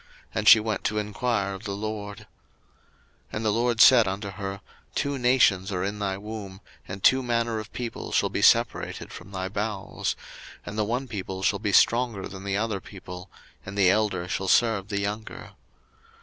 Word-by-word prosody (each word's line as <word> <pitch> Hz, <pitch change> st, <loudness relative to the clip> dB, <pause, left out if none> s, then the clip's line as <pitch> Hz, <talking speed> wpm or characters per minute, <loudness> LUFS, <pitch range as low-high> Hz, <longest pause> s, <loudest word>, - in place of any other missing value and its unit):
And 105 Hz, -1 st, -2 dB
she 115 Hz, -, +10 dB
went 110 Hz, -1 st, -2 dB
to 110 Hz, -1 st, 0 dB
enquire 105 Hz, -1 st, -1 dB
of 95 Hz, +3 st, -9 dB
the 100 Hz, -2 st, -3 dB
LORD. 105 Hz, -1 st, -5 dB
01:025:023 -, -, -15 dB, 1.1 s
And 110 Hz, +1 st, -3 dB
the 105 Hz, -, +3 dB
LORD 120 Hz, +1 st, 0 dB
said 120 Hz, -5 st, +8 dB
unto 100 Hz, +2 st, -3 dB
her, 100 Hz, -1 st, -6 dB, 0.3 s
Two 140 Hz, -1 st, -1 dB
nations 120 Hz, -7 st, +3 dB
are 90 Hz, -1 st, -1 dB
in 100 Hz, +2 st, -3 dB
thy 95 Hz, -2 st, -2 dB
womb, 100 Hz, -2 st, -8 dB, 0.3 s
and 95 Hz, 0 st, -7 dB
two 130 Hz, +1 st, +5 dB
manner 115 Hz, -2 st, 0 dB
of 110 Hz, -, -9 dB
people 120 Hz, -2 st, -5 dB
shall -, -, +2 dB
be -, -, -2 dB
separated -, -, +2 dB
from -, -, -10 dB
thy 95 Hz, -1 st, -4 dB
bowels; 100 Hz, 0 st, -3 dB, 0.5 s
and 100 Hz, -, -6 dB
the 110 Hz, -, +1 dB
one 125 Hz, +5 st, -2 dB
people 95 Hz, -4 st, -5 dB
shall 100 Hz, +1 st, +2 dB
be 105 Hz, -1 st, -1 dB
stronger 115 Hz, -2 st, +3 dB
than 95 Hz, 0 st, -9 dB
the 100 Hz, 0 st, 0 dB
other 105 Hz, -3 st, -2 dB
people; 90 Hz, -1 st, -10 dB, 0.3 s
and 95 Hz, +1 st, -8 dB
the 95 Hz, -2 st, +5 dB
elder 95 Hz, -4 st, 0 dB
shall 95 Hz, +1 st, -2 dB
serve 105 Hz, -1 st, +3 dB
the 100 Hz, -2 st, -2 dB
younger. 105 Hz, +2 st, -5 dB
105 Hz, 185 wpm, -26 LUFS, 95-110 Hz, 1.1 s, she